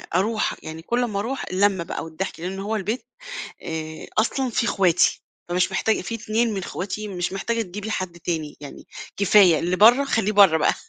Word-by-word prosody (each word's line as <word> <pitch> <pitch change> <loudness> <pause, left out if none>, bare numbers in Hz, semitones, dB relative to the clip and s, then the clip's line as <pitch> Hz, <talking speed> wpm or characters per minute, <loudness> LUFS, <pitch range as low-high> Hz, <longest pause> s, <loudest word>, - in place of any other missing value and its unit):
أروح 210 +4 +1
يعني 160 +1 -7
كل 240 +8 0
أما 210 -5 -2
أروح، 250 +6 -3
اللمّة 190 -1 +2
بقى - - -5
والضحك، 165 +3 -5
لأن 185 +3 -5
هو 210 +3 -2
البيت 215 +4 -3 0.6
آآ، 160 -1 -6
أصلًا 255 +3 +1
في 235 +1 0
اخواتي. 180 -5 +2 0.3
فمش 180 +2 +1
محتاج 220 +3 +1
في 230 - -5
2 225 +1 0
من 195 - -3
أخواتي 205 +4 -5
مش 180 -2 -3
محتاجة 230 +4 -1
تجيبي 205 +3 -6
حد 185 -4 -4
تاني، 160 -4 -3
يعني 145 - -10 0.3
كفاية 195 -4 +5
اللي 175 +3 -1
برّه 240 +8 +6
خليه 225 -6 0
برّه 195 -6 +6
بقى، - - +2
195 Hz, 180 wpm, -23 LUFS, 175-220 Hz, 0.6 s, برّه